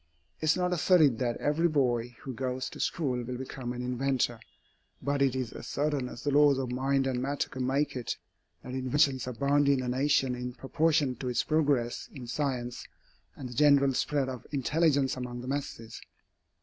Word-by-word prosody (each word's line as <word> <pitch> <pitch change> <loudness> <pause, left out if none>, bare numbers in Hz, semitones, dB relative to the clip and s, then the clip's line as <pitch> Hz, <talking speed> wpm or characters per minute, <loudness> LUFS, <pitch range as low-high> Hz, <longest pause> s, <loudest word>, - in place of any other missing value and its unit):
It - - -3
is 155 - +4
not 180 0 +1
asserted 155 -7 +4
that 120 -2 0
every 155 +4 +2
boy 125 -6 0
who 130 - -6
goes 130 +1 -3
to - - -10
school 130 -7 -1
will 125 +1 -5
become 130 -1 -5
an 125 0 -4
inventor. 125 -1 0 0.6
But 140 0 -1
it 135 -2 +3
is 130 -3 -3
as - - -8
certain 145 -3 -1
as 120 - -9
the 145 - 0
laws 145 -1 +5
of 130 -2 -2
mind 135 +2 +1
and 130 -2 -1
matter 140 +2 -1
can 130 -1 -3
make 140 +2 0
it, 125 -3 -3 0.5
that 125 - -7
inventions 130 0 +1
abound 140 +3 +2
in 135 -2 +2
a - - -3
nation 135 +1 +2
in 125 0 -5
proportion 150 -1 +1
to 130 - -3
its 125 - +1
progress 145 -6 0
in 130 -4 -9
science 125 -2 -3 0.5
and 130 -3 -7
the - - -8
general 140 0 +5
spread 140 +1 0
of 130 -2 -7
intelligence 145 0 +2
among 125 -1 -5
the 125 - -8
masses. 135 -5 -5
135 Hz, 190 wpm, -29 LUFS, 125-145 Hz, 0.6 s, laws